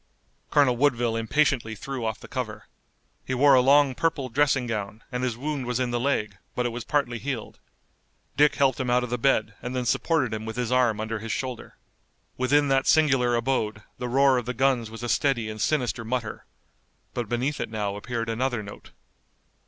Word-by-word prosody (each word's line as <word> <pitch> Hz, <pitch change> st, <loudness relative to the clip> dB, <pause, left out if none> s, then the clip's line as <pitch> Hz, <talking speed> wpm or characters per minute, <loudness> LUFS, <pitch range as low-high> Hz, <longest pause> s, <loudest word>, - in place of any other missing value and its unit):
Colonel 130 Hz, -4 st, +3 dB
Woodville 120 Hz, -4 st, +2 dB
impatiently 115 Hz, -1 st, +1 dB
threw 130 Hz, +3 st, -5 dB
off 110 Hz, -1 st, -2 dB
the -, -, -11 dB
cover. -, -, -5 dB, 0.6 s
He 130 Hz, -, -3 dB
wore 140 Hz, +2 st, +6 dB
a 130 Hz, -, +7 dB
long 140 Hz, +1 st, +5 dB
purple 145 Hz, -2 st, -1 dB
dressing 135 Hz, 0 st, +2 dB
gown, 105 Hz, -1 st, -4 dB
and 125 Hz, 0 st, -2 dB
his 120 Hz, -3 st, -1 dB
wound 140 Hz, -1 st, -3 dB
was 125 Hz, 0 st, -1 dB
in 125 Hz, -1 st, 0 dB
the 120 Hz, -, 0 dB
leg, 105 Hz, -7 st, -1 dB, 0.2 s
but 125 Hz, -, 0 dB
it -, -, +1 dB
was 120 Hz, 0 st, -5 dB
partly 125 Hz, -5 st, 0 dB
healed. 130 Hz, -5 st, -5 dB, 0.8 s
Dick 150 Hz, 0 st, +4 dB
helped 135 Hz, -3 st, +2 dB
him 130 Hz, -2 st, -1 dB
out 125 Hz, 0 st, +3 dB
of 125 Hz, -, -5 dB
the 125 Hz, -, -1 dB
bed 110 Hz, -4 st, +2 dB
and 125 Hz, +1 st, -5 dB
then 125 Hz, -1 st, -1 dB
supported 130 Hz, -2 st, +1 dB
him 110 Hz, 0 st, -4 dB
with 110 Hz, 0 st, -6 dB
his 125 Hz, -1 st, -2 dB
arm 125 Hz, -4 st, +3 dB
under 110 Hz, 0 st, -3 dB
his 115 Hz, +1 st, -5 dB
shoulder. 130 Hz, -2 st, -5 dB, 0.6 s
Within 145 Hz, +3 st, +2 dB
that 135 Hz, 0 st, +2 dB
singular 135 Hz, -6 st, +4 dB
abode 115 Hz, -3 st, -1 dB, 0.2 s
the 125 Hz, -, -3 dB
roar 135 Hz, 0 st, +4 dB
of 120 Hz, -, -8 dB
the 125 Hz, -, -3 dB
guns 130 Hz, -4 st, +1 dB
was 115 Hz, +2 st, -9 dB
a -, -, -2 dB
steady 120 Hz, -3 st, +1 dB
and 110 Hz, -1 st, -7 dB
sinister 125 Hz, -6 st, 0 dB
mutter, 115 Hz, -1 st, -4 dB, 0.7 s
but 120 Hz, -4 st, -3 dB
beneath 130 Hz, +5 st, -1 dB
it -, -, -3 dB
now 105 Hz, -2 st, -2 dB
appeared 115 Hz, +2 st, -4 dB
another 120 Hz, 0 st, -1 dB
note. 100 Hz, 0 st, -11 dB
125 Hz, 200 wpm, -26 LUFS, 115-135 Hz, 0.8 s, a